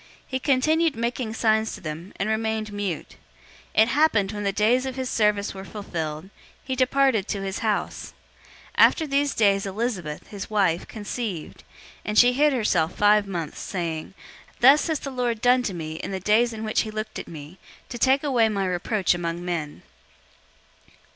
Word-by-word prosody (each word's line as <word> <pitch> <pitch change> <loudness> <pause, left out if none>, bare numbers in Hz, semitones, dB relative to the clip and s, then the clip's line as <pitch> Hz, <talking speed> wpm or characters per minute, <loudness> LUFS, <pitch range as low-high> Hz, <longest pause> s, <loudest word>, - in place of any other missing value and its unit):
He 260 - -3
continued 310 +4 +2
making 235 0 -3
signs 220 -1 +1
to 205 - -12
them, 165 +3 -6
and 195 - -2
remained 220 -1 -1
mute. 200 -5 -4 0.6
001:023 220 - +8
It - - -1
happened, 240 -9 +2
when 205 -1 -5
the 200 - +1
days 235 +6 +2
of 260 - -5
his 260 -1 -3
service 210 -2 +1
were 190 0 -8
fulfilled, 170 -4 -5 0.3
he 260 - -3
departed 255 -4 +2
to 200 -2 -3
his 195 0 -3
house. 215 -2 -2 0.6
001:024 - - +10
After 320 - -3
these 280 0 0
days 200 -2 +3
Elizabeth, 195 -7 -3
his 200 -2 -7
wife, 190 -6 +1
conceived, 205 -5 -5 0.4
and 210 0 -3
she 245 +2 +7
hid 295 +3 +3
herself 185 - +1
five 210 0 +4
months, 170 -5 -5
saying, 170 -1 -4 0.4
001:025 - - -29
"Thus 275 +5 +6
has 320 -3 -1
the 275 - -5
Lord 245 -3 -1
done 250 +2 +4
to 215 -6 -3
me 155 -2 -5
in - - -5
the 190 -1 -3
days 220 +5 +3
in 220 -1 -6
which 215 - +1
he 220 - -4
looked 215 0 -5
at - - -8
me, 155 +3 -10 0.3
to 240 - -6
take 265 +4 +3
away 245 -6 +3
my 200 -2 -1
reproach 185 +2 0
among 175 0 -4
men." 160 -4 -4
215 Hz, 180 wpm, -24 LUFS, 190-245 Hz, 0.6 s, 001:024